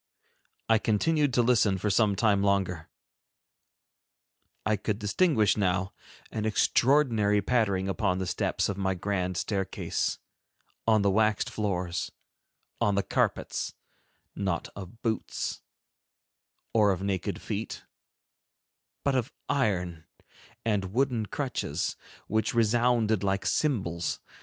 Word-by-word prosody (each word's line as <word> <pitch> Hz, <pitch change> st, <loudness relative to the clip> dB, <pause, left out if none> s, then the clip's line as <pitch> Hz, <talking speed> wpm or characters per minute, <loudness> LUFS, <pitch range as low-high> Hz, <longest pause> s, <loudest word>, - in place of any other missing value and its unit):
I 115 Hz, -1 st, +4 dB
continued 145 Hz, +8 st, +2 dB
to 120 Hz, -, +4 dB
listen 115 Hz, -5 st, +3 dB
for 105 Hz, +3 st, 0 dB
some 100 Hz, 0 st, +3 dB
time 100 Hz, -1 st, +3 dB
longer. 95 Hz, -5 st, 0 dB, 1.8 s
I 110 Hz, +2 st, +3 dB
could 105 Hz, 0 st, -2 dB
distinguish 110 Hz, -, +2 dB
now 95 Hz, -1 st, 0 dB, 0.4 s
an 110 Hz, -, -3 dB
extraordinary 110 Hz, -2 st, +3 dB
pattering 100 Hz, -3 st, +1 dB
upon 95 Hz, -1 st, 0 dB
the 95 Hz, -, -2 dB
steps -, -, 0 dB
of 100 Hz, -1 st, -3 dB
my 95 Hz, -1 st, 0 dB
grand 90 Hz, -1 st, -2 dB
staircase, 95 Hz, +2 st, -1 dB, 0.7 s
on 110 Hz, -2 st, +4 dB
the 100 Hz, -, +3 dB
waxed 105 Hz, +1 st, +2 dB
floors, 90 Hz, -4 st, -2 dB, 0.7 s
on 100 Hz, -, +2 dB
the 100 Hz, -, +1 dB
carpets, -, -, -1 dB, 0.6 s
not 95 Hz, -4 st, -2 dB
of 100 Hz, +4 st, -10 dB
boots, 110 Hz, -2 st, -2 dB, 1.1 s
or 105 Hz, -2 st, +5 dB
of 95 Hz, 0 st, -2 dB
naked 95 Hz, -3 st, -2 dB
feet, -, -, -5 dB, 1.2 s
but 140 Hz, -, +2 dB
of 130 Hz, 0 st, 0 dB, 0.2 s
iron 90 Hz, -, 0 dB, 0.6 s
and 100 Hz, -4 st, 0 dB
wooden 125 Hz, -4 st, +1 dB
crutches, 115 Hz, -, -2 dB, 0.3 s
which 110 Hz, +2 st, 0 dB
resounded 115 Hz, -2 st, +3 dB
like 100 Hz, 0 st, 0 dB
cymbals. 95 Hz, -, 0 dB
105 Hz, 115 wpm, -28 LUFS, 95-115 Hz, 1.8 s, or